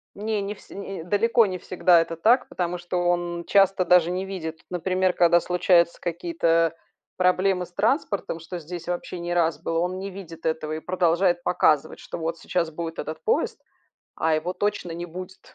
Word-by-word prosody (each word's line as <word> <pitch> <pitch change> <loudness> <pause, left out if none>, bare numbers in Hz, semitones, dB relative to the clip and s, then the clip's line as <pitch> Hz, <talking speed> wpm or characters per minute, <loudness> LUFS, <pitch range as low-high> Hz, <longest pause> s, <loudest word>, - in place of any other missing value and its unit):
Не, 210 0 -2
не 200 +1 -3
все - - -16
э, 195 -3 -6
далеко 230 +5 +3
не 185 -2 -3
всегда 175 -1 +3
это 165 0 -4
так, 230 +10 +3
потому 180 0 -2
что 175 +1 -4
он 175 -1 0
часто 195 -2 +4
даже 180 -1 +5
не 185 +1 -2
видит. 160 -5 -6
Например, 185 +1 0
когда 175 0 +5
случаются 175 -1 +2
какие-то 165 -1 +1 0.4
проблемы 185 0 +2
с 175 - -22
транспортом- 200 - 0
что 170 +2 -7
здесь 170 +2 -8
вообще 175 0 -4
не 175 0 -3
раз 165 -3 +1
было- 165 0 -1
он 180 +2 -1
не 195 - -5
видит 170 -4 -10
этого 160 -1 -1
и 155 - -3
продолжает 175 0 +1
показывать, 155 -4 +2
что - - -7
вот 165 0 -3
сейчас 170 -2 -1
будет 165 +1 -5
этот 155 - -5
поезд, 460 - 0 0.6
а 160 0 +1
его 160 +4 -1
точно 185 -3 -2
не 175 +1 -5
будет. 185 +2 -10
175 Hz, 180 wpm, -25 LUFS, 165-185 Hz, 0.6 s, даже